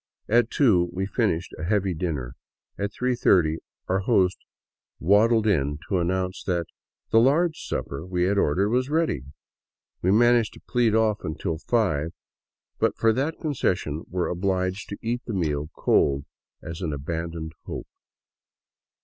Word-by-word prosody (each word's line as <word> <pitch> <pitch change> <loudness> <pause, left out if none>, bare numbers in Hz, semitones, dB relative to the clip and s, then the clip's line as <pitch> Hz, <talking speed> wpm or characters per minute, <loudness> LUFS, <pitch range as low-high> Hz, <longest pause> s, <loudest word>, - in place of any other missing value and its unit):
At 120 +1 +3
two 95 -11 +3
we 95 +2 -2
finished 95 -5 -1
a - - -5
heavy 95 0 +1
dinner. 75 -8 -3 0.4
At 100 0 -3
three 125 +3 0
thirty 80 -8 +3 0.3
our 95 +1 +1
host 95 -3 +2 0.6
waddled 110 +5 +4
in 75 -8 +1
to 95 - +2
announce 90 +2 -1
that 85 -3 0 0.5
the 115 - +6
"large 155 +7 +3
supper" 70 +3 -4
we 90 0 -1
had 100 +2 +2
ordered 95 +7 +2
was 125 +3 +1
ready! 160 - +1 0.8
We 90 - +1
managed 120 +2 +4
to - - -14
plead 120 -4 +2
off 110 -1 +2
until 80 +1 -3
five, 90 -8 0 0.7
but - - +1
for 115 -1 +3
that 140 +7 -1
concession 90 - -1
were 90 -1 -1
obliged 95 +1 -1
to 100 - -5
eat 120 +2 -1
the 115 - -3
meal 75 -4 -1
cold 70 -1 +2 0.4
as 80 +2 -7
an 80 -5 -2
abandoned 80 +2 -4
hope. - - -5
95 Hz, 150 wpm, -25 LUFS, 85-115 Hz, 0.8 s, the